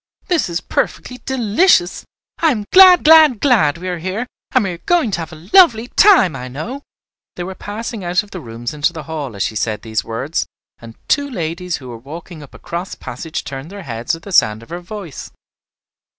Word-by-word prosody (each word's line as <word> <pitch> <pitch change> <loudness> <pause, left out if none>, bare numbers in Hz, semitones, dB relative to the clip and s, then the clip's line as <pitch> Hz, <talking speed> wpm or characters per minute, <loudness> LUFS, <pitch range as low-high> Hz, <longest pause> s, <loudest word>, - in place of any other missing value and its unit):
This 345 - +1
is 170 +1 -2
perfectly 250 0 -3
delicious. 235 - +2 0.3
I 325 - +4
am 215 -8 -1
glad, 370 -1 +8
glad, 310 -6 +7
glad 210 - +3
we 180 +2 -7
are 180 -2 -3
here, 190 +8 -3 0.3
and 255 - +3
we 195 - -2
are 170 - -8
going 340 -11 +1
to 180 - -2
have 165 - -6
a 160 +2 -13
lovely 245 - +6
time, 365 - +5
I 125 -1 -6
know." 215 - -6 0.5
They 175 - -5
were 190 +2 -6
passing 210 +2 -6
out 180 +3 +1
of 210 - -18
the 185 - -6
rooms 120 -2 -7
into 150 +4 0
the 160 -2 -7
hall 150 -8 -6
as 100 - -1
she 110 - -3
said 105 -1 -2
these 110 -2 -2
words, 115 +8 -3 0.3
and 115 -1 -12
two 285 -1 +1
ladies 175 - -3
who 130 -2 -11
were 115 -1 -8
walking 160 +5 -10
up 145 - -14
a - - -10
cross 175 +3 -6
passage 155 +6 -6
turned 135 +3 -7
their 200 0 -9
heads 120 +1 -3
at 165 - -14
the 200 - -9
sound 110 - +3
of - - -17
her 175 - -5
voice. 180 -4 -8
175 Hz, 210 wpm, -18 LUFS, 145-225 Hz, 0.5 s, glad